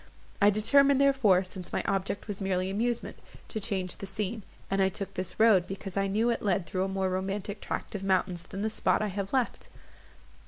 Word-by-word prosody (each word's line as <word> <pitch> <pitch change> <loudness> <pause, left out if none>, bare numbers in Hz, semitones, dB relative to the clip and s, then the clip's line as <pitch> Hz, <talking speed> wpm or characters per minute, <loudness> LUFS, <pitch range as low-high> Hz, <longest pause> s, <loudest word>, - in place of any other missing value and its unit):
I 205 - +7
determined, 275 +7 +4
therefore, 265 -10 +4
since 185 -1 -9
my - - -1
object 195 +1 -2
was 205 -1 -5
merely 190 -1 0
amusement, 235 +4 -2 0.3
to 220 - -3
change 190 -4 -2
the 195 - -6
scene; 210 +3 -3 0.3
and 195 0 0
I 190 - +4
took 195 0 -6
this 185 -1 -5
road, 215 -6 +5
because 195 -1 -6
I 195 0 +1
knew 220 +5 +2
it 235 - -2
led 195 -3 +1
through 185 +1 -1
a 195 0 -4
more 190 -1 +1
romantic 195 +2 -3
tract - - -4
of 200 -2 -4
mountains 185 -2 +1
than 200 0 -5
the 220 - +1
spot 215 - +1
I 210 - -1
have 195 0 -4
left. 260 -3 -1
195 Hz, 205 wpm, -29 LUFS, 190-215 Hz, 0.3 s, I